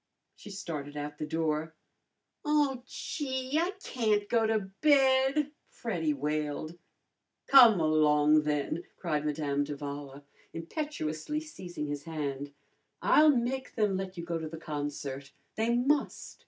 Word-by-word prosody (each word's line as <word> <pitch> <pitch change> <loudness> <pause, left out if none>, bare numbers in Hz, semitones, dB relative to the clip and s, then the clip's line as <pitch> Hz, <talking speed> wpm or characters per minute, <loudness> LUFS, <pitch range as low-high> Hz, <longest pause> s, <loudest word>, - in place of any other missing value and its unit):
She 210 - -12
started 150 -7 -6
out 145 0 -5
the 155 - -3
door. 160 0 -1 0.7
"Oh, 295 -4 +2
gee! 265 0 -2
I 350 +4 0
can't 215 -4 0
go 225 -1 +2
to 220 0 +2 0.2
bed!" 275 0 +4 0.2
Freddy 170 -9 -2
wailed. 150 +3 -3 0.7
"Come 240 -8 +8
along, 155 -1 +4
then!" 150 +2 -1
cried 155 -4 -1
Madame 145 -1 0
d'Avala, 145 -1 -6 0.3
impetuously 165 - -3
seizing 185 - -7
his 145 -1 -5
hand. 145 -3 -4 0.5
"I'll 310 0 +6
make 260 +3 -2
them 210 -4 +2
let 190 -1 -4
you 170 - -5
go 170 -1 -2
to 160 -1 -5
the 160 - -7
concert. 145 -3 -5 0.2
They 230 +2 +1
must!" 275 +4 0
165 Hz, 125 wpm, -30 LUFS, 150-250 Hz, 0.7 s, Come